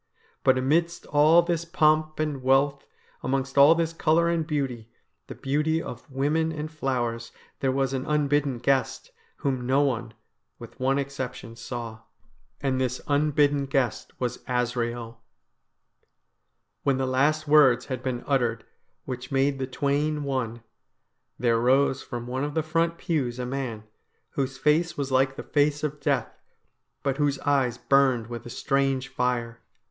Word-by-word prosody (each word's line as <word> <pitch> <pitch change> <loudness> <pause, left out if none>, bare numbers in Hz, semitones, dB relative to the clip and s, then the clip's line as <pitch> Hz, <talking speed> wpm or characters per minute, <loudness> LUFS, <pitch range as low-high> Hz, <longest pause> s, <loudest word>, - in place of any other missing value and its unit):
But 130 0 +4
amidst 165 +6 +1
all 155 +4 +5
this 170 -1 -1
pomp 155 -2 +2
and 150 -3 -1
wealth, 135 +2 +2 0.3
amongst 135 +1 -2
all 140 +4 +7
this 165 0 -1
colour 165 +1 +2
and 165 -2 0
beauty, 130 -7 -3 0.4
the - - -8
beauty 150 +4 0
of 120 -6 -8
women 150 +5 0
and 155 0 -5
flowers, 120 -6 -2 0.3
there 135 - +1
was 135 0 0
an 130 -1 -3
unbidden 145 -3 +1
guest, 135 - 0 0.3
whom 130 -4 -2
no 135 +2 +3
one, 120 -4 -2 0.4
with - - -12
one 135 +1 +2
exception, 130 -4 -5
saw, 115 -1 -6 0.6
and 130 -2 0
this 125 0 -1
unbidden 145 -1 +2
guest 135 -3 -1
was 125 -2 -2
Azrael. 120 -2 -2 1.6
When 135 -2 +1
the 135 - 0
last 145 +4 +1
words 135 -5 +5
had 130 -2 -4
been 130 -2 -3
uttered 120 -5 0 0.4
which 125 0 -6
made 135 0 +1
the 130 - -2
twain 145 +3 0
one, 120 -4 -3 0.7
there 115 -1 +2
rose 135 +2 +3
from 120 -1 -6
one 130 +2 -3
of 145 0 -3
the 160 - +1
front 165 +2 0
pews 135 -9 -1
a 125 - -3
man, 125 -4 -4 0.5
whose 135 -1 -2
face 155 +3 +2
was 140 -2 -3
like 135 +1 +2
the - - -6
face 145 0 +1
of 150 -1 -2
death, 135 -6 -1 0.6
but 135 -1 0
whose 145 -1 +1
eyes 135 -4 +1
burned 135 -4 +3
with 120 0 -6
a - - -8
strange 135 +1 0
fire. 120 -2 -2
135 Hz, 150 wpm, -26 LUFS, 125-150 Hz, 1.6 s, all